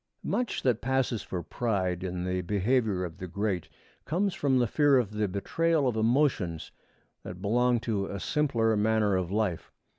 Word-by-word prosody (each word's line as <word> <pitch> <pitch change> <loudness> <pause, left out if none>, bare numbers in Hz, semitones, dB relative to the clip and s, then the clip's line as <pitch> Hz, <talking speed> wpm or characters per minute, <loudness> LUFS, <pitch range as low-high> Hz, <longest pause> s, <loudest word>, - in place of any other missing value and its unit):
Much 245 -2 -1
that 120 -3 +1
passes 130 -4 0
for 90 -2 -5
pride 95 -4 -1
in 90 -1 -3
the 90 0 -1
behavior 105 0 +1
of 85 +1 -9
the 90 - -5
great 95 -1 -2 0.3
comes 185 +5 0
from 135 -5 +1
the 125 - +3
fear 145 +4 +4
of 115 -5 0
the 105 0 -1
betrayal 150 - 0
of 120 - 0
emotions 110 - +1 0.5
that 90 - -8
belong 120 +4 +2
to 110 -4 -2
a 100 - -5
simpler 115 -5 +1
manner 105 -1 +2
of 90 -2 -1
life. 100 -4 -1
110 Hz, 170 wpm, -28 LUFS, 95-125 Hz, 0.5 s, fear